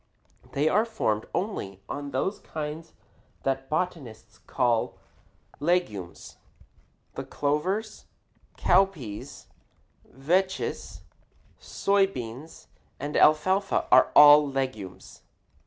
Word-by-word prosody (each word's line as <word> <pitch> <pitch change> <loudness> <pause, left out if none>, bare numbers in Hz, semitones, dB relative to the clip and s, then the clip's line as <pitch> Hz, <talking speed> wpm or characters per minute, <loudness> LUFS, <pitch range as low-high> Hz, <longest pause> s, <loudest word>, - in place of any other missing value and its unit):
They 145 +3 +1
are 210 +7 +3
formed 110 - -2
only 140 - -4
on 145 0 -5
those 165 +10 -2
kinds 155 +1 -7 0.5
that 135 0 -2
botanists 150 -10 -4
call 120 -3 0 0.6
legumes. 145 - -2 0.8
The - - -5
clovers, 185 +10 -2 0.5
cowpeas, 170 - 0 0.7
vetches, 185 +8 -2 0.6
soy 200 -1 +1
beans, 130 -1 -9 0.3
and 145 +2 -5
alfalfa 185 +6 +3
are - - +6
all 150 0 +8
legumes. 130 -9 -5
150 Hz, 85 wpm, -26 LUFS, 130-185 Hz, 0.8 s, all